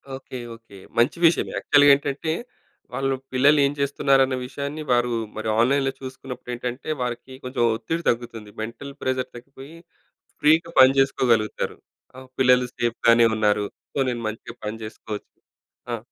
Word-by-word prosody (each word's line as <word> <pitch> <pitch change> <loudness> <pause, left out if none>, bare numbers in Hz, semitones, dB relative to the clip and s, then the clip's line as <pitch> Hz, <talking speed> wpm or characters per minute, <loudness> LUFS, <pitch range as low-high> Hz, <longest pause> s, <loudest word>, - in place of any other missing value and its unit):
Okay. 130 -1 -8 0.2
Okay. 115 -3 -16 0.2
మంచి 120 +8 +3
విషయమే. 165 - +3
యాక్చువల్‌గా 145 -1 +5
ఏంటంటే 145 +3 -2 0.6
వాళ్ళు 135 0 0 0.2
పిల్లలు 145 +3 +5
ఏం 140 - +1
చేస్తున్నారన్న 135 -1 +2
విషయాన్ని 140 +3 -5
వారు 120 0 +2 0.3
మరి 110 - -4
ఆన్‌లైన్‌లో 135 +3 +3
చూసుకున్నప్పుడు 130 -1 -8
ఏంటంటే 125 +4 -5
వారికి 125 +1 -4
కొంచెం 125 -1 -3
ఒత్తిడి 160 +10 -3
తగ్గుతుంది. 115 -3 -3
మెంటల్ 130 +5 -7
ప్రెషర్ 130 0 -1
తగ్గిపోయి 135 +5 -12 0.7
ఫ్రీ‌గా 160 +3 +4
పనిచేసుకోగలుగుతారు. 130 -4 +3 0.4
ఆ! - - -11 0.2
పిల్లలు 125 -1 +4
సేఫ్‌గానే 115 0 +3
ఉన్నారు. 105 -1 +2 0.3
సో - - -5
నేను 120 -1 -4
మంచిగా 110 +2 -8
పని 110 +1 -3
చేసుకోవచ్చు. 110 -1 -8 0.6
ఆ! 115 - -3
130 Hz, 130 wpm, -23 LUFS, 115-140 Hz, 0.7 s, యాక్చువల్‌గా